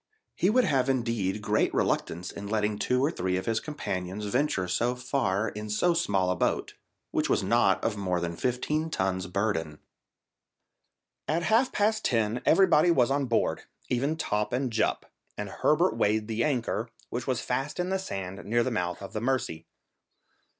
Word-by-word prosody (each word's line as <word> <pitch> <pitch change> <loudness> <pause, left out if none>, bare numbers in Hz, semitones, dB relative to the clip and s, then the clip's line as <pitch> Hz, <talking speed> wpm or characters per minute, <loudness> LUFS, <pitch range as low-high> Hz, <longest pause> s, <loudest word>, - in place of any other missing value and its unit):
He 185 - +2
would 250 +4 +4
have 135 - +2
indeed 115 -6 -1
great 105 +1 +2
reluctance 85 +2 -1
in 100 0 -7
letting 105 0 0
two 125 +2 +2
or 155 - +1
three 90 - -1
of 95 - -4
his 115 -1 +1
companions 100 - -4
venture 105 -4 0
so 120 +7 0
far 120 -5 0
in 105 0 -7
so 170 +12 +2
small 100 - +1
a - - 0
boat, - - -1 0.4
which - - 0
was - - +2
not - - +3
of 105 - 0
more 90 -3 0
than 85 -1 -3
fifteen 140 - -1
tons' 95 - -1
burden. 90 -6 -1 1.5
At 160 +4 0
half 230 +7 +3
past 215 +1 +1
ten 115 0 +1
everybody 175 -2 +5
was 135 -6 +3
on 140 0 +1
board, 115 -2 0 0.2
even 140 +6 0
Top 105 -5 -1
and 125 -1 -1
Jup, 110 - 0 0.3
and 105 -1 -4
Herbert 160 - +2
weighed 105 +1 +1
the 115 +1 0
anchor, 120 -4 -1 0.2
which 120 +1 -4
was 130 -3 0
fast 135 +6 -2
in 180 +1 0
the 190 0 0
sand 95 - -5
near 120 +3 +1
the 130 - -1
mouth 90 -3 -2
of 100 - -8
the 110 - -3
Mercy. 120 -11 -1
115 Hz, 175 wpm, -28 LUFS, 100-140 Hz, 1.5 s, everybody